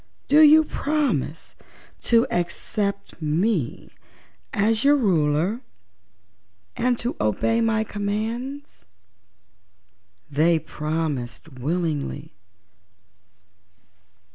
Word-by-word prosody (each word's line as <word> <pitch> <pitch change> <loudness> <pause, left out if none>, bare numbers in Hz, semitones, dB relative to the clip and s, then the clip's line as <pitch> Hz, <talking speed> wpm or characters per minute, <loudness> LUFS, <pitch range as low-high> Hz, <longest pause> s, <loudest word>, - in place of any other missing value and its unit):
Do 295 - +5
you 310 +1 +8
promise 280 - -2 0.6
to 230 0 +5
accept 200 +2 -3
me 160 - -1 0.6
as 220 +2 +1
your 285 +1 +6
Ruler 180 - +1 1.1
and 245 0 +1
to 240 +2 -2
obey 165 - +1
my 220 -1 +2
commands?" 225 +7 -4 1.4
They 160 +4 +3
promised 150 -6 -4
willingly. 150 +1 -3
200 Hz, 70 wpm, -23 LUFS, 155-235 Hz, 1.4 s, you